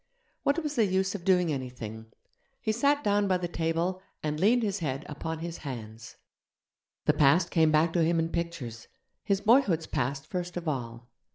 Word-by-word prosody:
What 295 +4 +1
was 300 -1 -2
the 225 - +5
use 190 +1 +1
of 195 -4 -6
doing 180 -4 +3
anything? 120 -4 -6 0.5
He 220 - 0
sat 285 +6 +2
down 205 -2 +2
by 185 -1 +3
the 180 -1 -3
table 170 +2 -1 0.2
and 150 0 -2
leaned 230 +6 +4
his 200 -2 -1
head 140 -3 -3
upon 160 +2 -4
his 170 +1 -6
hands. 115 -5 -8 0.9
The - - +4
past 145 +5 +4
came 160 -2 +4
back 160 +2 +3
to 170 - +3
him 165 +1 +2
in 165 0 +1
pictures: 165 -10 -4 0.4
his 200 -2 +1
boyhood's 205 - +4
past 140 0 -2
first 180 +1 -4
of 175 -1 -5
all. 120 -4 -4
165 Hz, 180 wpm, -29 LUFS, 140-190 Hz, 0.9 s, the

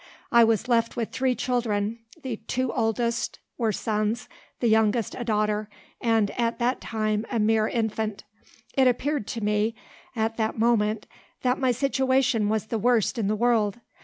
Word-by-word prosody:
I 235 0 +7
was 225 +1 +2
left 230 -2 +2
with 230 -2 -2
three 260 -1 +1
children; 230 -3 -1 0.2
the 250 -4 -3
two 255 -1 -1
oldest 235 +1 0 0.2
were 225 -2 +2
sons, 215 +2 -1 0.3
the - - -1
youngest 220 0 +2
a 245 - -4
daughter, 215 -1 0 0.3
and, 225 -3 +2
at 235 0 +1
that 245 +2 0
time, 215 -1 -1
a 240 - -1
mere 220 0 +3
infant. 220 -2 -2 0.5
It 265 -1 +4
appeared 255 -1 0
to 230 - -4
me, 210 +2 +1 0.4
at 225 0 -1
that 220 0 -1
moment, 220 -2 +2 0.4
that 250 0 +1
my 260 -2 +3
situation 260 -3 +1
was 215 -1 0
the 225 0 -2
worst 235 +1 +2
in 210 - 0
the 215 - +1
world. 225 -2 +2
225 Hz, 160 wpm, -26 LUFS, 215-240 Hz, 0.5 s, I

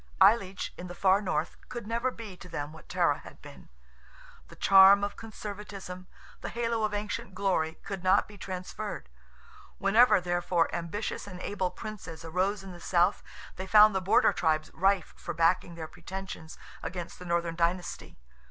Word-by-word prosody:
Aileach, 195 -1 +4
in 180 - -6
the 175 - -8
far 195 +2 +4
North, 165 -5 -2
could 240 -3 -6
never 235 +3 0
be 225 -6 -9
to 180 0 -13
them 150 -2 -5
what 160 - -14
Tara - - +2
had - - -13
been. - - -14 0.8
The - - -14
charm 195 +1 +7
of 205 0 -2
conservatism, 200 -4 -8 0.3
the - - -4
halo 230 -1 -1
of 215 -1 +1
ancient 205 -2 -4
glory, 180 -5 0
could 195 -2 -5
not 185 0 +4
be 210 - -13
transferred. 185 - -6 0.7
Whenever, 215 +3 +5
therefore, 175 -1 0
ambitious 175 +6 -4
and 180 -3 -8
able 190 -2 -1
Princes 185 -5 -8
arose 190 +4 0
in 190 - -8
the 175 - -10
South, 175 0 +2 0.4
they 190 +1 -5
found 210 +1 +7
the 190 - 0
border 185 - +4
tribes 155 -1 0
rife 190 0 +1
for - - -6
backing 170 +1 +2
their 160 -1 -6
pretensions 180 -1 -8 0.2
against 175 -1 -6
the 180 - -9
Northern 170 -1 0
dynasty. 175 +2 -2
185 Hz, 165 wpm, -29 LUFS, 175-205 Hz, 0.8 s, charm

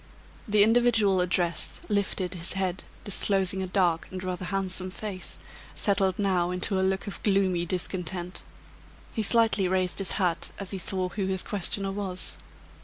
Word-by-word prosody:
The 210 -1 +5
individual 220 -4 +3
addressed 175 -2 0
lifted 200 -3 -1
his 170 0 +2
head, 190 -1 -2 0.2
disclosing 195 -1 +2
a 190 - -3
dark 180 -3 +1
and 185 0 -6
rather 185 0 -3
handsome 185 -1 -1
face, 195 0 -5 0.4
settled 195 -3 +2
now 185 -4 +1
into 180 +2 0
a - - +1
look 190 +1 0
of 200 - -7
gloomy 190 -4 +1
discontent. 180 0 -3 0.7
He 220 - -1
slightly 220 -3 +3
raised 185 0 0
his 195 -3 +5
hat 180 -4 0
as 195 -2 -6
he 195 - -3
saw 185 0 -1
who 190 +1 -3
his 190 -1 -1
questioner 195 -1 -1
was. 195 -2 -2
190 Hz, 155 wpm, -27 LUFS, 180-200 Hz, 0.7 s, The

